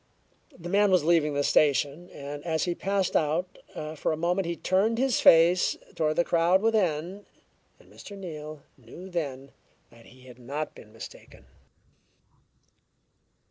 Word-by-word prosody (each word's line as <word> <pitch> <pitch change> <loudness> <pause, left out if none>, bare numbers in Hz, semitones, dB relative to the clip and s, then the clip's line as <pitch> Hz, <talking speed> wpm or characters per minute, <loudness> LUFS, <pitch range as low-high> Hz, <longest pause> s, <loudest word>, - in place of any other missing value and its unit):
The 175 0 -9
man 200 +3 +3
was 185 -4 +3
leaving 155 -3 +2
the 145 - +1
station, 145 +4 +1
and 145 +1 -8
as 160 -2 -1
he 175 - -1
passed 195 +1 -1
out, 160 +4 0 0.4
for 155 - -1
a 155 - -2
moment 175 +3 0
he 170 - -2
turned 200 +7 +1
his 260 -1 +1
face 170 +2 +5 0.2
toward 155 -2 0
the 175 - +3
crowd 170 +2 +3
within; 190 -3 0 0.5
and - - -21
Mr. 200 - -11
Neal 155 -5 -8 0.2
knew 175 +11 -12
then 140 -5 -4 0.4
that 115 0 -18
he 130 +2 -18
had 125 -1 -14
not 145 +5 -5
been 105 - -15
mistaken. 115 - -12
165 Hz, 145 wpm, -27 LUFS, 145-185 Hz, 0.5 s, face